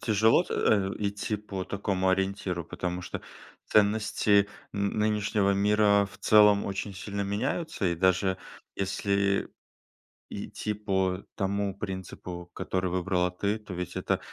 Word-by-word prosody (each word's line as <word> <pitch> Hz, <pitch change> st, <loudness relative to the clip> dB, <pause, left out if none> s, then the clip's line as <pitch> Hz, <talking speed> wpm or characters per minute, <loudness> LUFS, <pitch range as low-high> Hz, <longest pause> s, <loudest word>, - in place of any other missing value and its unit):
тяжело 110 Hz, -, +4 dB
т -, -, -4 dB
э, 100 Hz, -3 st, +2 dB
идти 105 Hz, +1 st, -2 dB
по 100 Hz, -3 st, -5 dB
такому 95 Hz, -1 st, -1 dB
ориентиру, 95 Hz, -2 st, 0 dB
потому 90 Hz, +3 st, -4 dB
что -, -, -5 dB, 0.5 s
ценности 105 Hz, -1 st, +3 dB, 0.2 s
н 100 Hz, 0 st, -1 dB
нынешнего 105 Hz, -1 st, +2 dB
мира 100 Hz, 0 st, +4 dB
в -, -, -14 dB
целом 105 Hz, -1 st, +6 dB
очень 100 Hz, +1 st, -4 dB
сильно 100 Hz, +2 st, -5 dB
меняются. 105 Hz, -, -2 dB
И 85 Hz, -, +1 dB
даже 95 Hz, +2 st, +2 dB, 0.4 s
если 100 Hz, 0 st, 0 dB, 0.8 s
идти 105 Hz, -, -4 dB
по 95 Hz, -2 st, -1 dB
тому 100 Hz, 0 st, -1 dB
принципу, 95 Hz, -3 st, -6 dB
который 95 Hz, -1 st, -2 dB
выбрала 90 Hz, 0 st, +1 dB
ты, 100 Hz, +4 st, -1 dB
то 105 Hz, -3 st, -9 dB
ведь 90 Hz, 0 st, -5 dB
это -, -, 0 dB
100 Hz, 130 wpm, -28 LUFS, 95-105 Hz, 0.8 s, целом